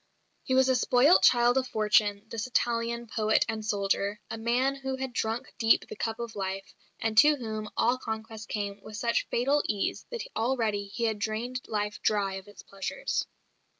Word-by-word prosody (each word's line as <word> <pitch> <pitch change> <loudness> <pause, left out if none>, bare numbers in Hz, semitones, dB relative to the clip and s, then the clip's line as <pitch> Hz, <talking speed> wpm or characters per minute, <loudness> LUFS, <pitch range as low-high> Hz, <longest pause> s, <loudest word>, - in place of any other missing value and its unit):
He 260 - -1
was 265 0 +5
a 260 - +3
spoilt 250 +7 +5
child 245 +1 +5
of 260 - -3
fortune, 210 -2 +2
this 225 +2 -4
Italian 235 -1 0
poet 220 -1 +2
and 220 0 -3
soldier, 200 0 0
a - - -3
man 245 +4 +1
who 265 -1 -4
had 260 -1 -5
drunk 225 +3 -2
deep 225 -1 +4
of - - -19
the - - -6
cup 225 +1 -3
of 235 -1 -6
life, 195 0 -4 0.3
and 225 -1 -1
to 300 +1 +7
whom 215 -5 -5
all 245 +2 +2
conquests 220 -2 -6
came 205 -1 -4
with 215 -1 -9
such 235 +1 0
fatal 275 +5 +2
ease 205 -2 -2
that 475 -2 -5
already 225 -4 0
he 235 +4 -5
had 220 -2 0
drained 230 +4 -3
life 210 -1 -2
dry 200 -2 +1
of 190 +1 -7
its 205 - -13
pleasures. 195 - -3
225 Hz, 185 wpm, -28 LUFS, 210-250 Hz, 0.3 s, to